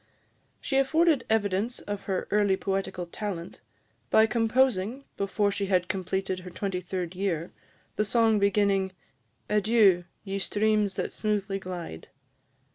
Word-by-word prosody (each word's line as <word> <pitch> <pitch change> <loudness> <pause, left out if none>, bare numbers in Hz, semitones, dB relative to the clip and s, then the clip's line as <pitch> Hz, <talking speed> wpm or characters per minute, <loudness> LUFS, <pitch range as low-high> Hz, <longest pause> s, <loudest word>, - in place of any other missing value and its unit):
She 270 - -1
afforded 310 0 +3
evidence 215 +2 +1
of 205 -1 -6
her 190 -2 -2
early 205 -2 +3
poetical 190 -2 -2
talent, 175 -1 -6 0.5
by 220 - +6
composing, 235 +1 +1
before 200 +1 0
she 200 0 -2
had 180 -2 +2
completed 190 0 -2
her 180 0 -9
twenty 185 0 -3
third 180 -1 -4
year, 180 -3 -2 0.5
the 210 - +3
song 225 0 +3
beginning, 200 -1 +2 0.5
"Adieu! 210 -4 +4 0.2
ye 195 -1 -3
streams 210 -1 +1
that - - -3
smoothly 200 -2 -1
glide." 175 - -7
200 Hz, 125 wpm, -27 LUFS, 185-215 Hz, 0.5 s, by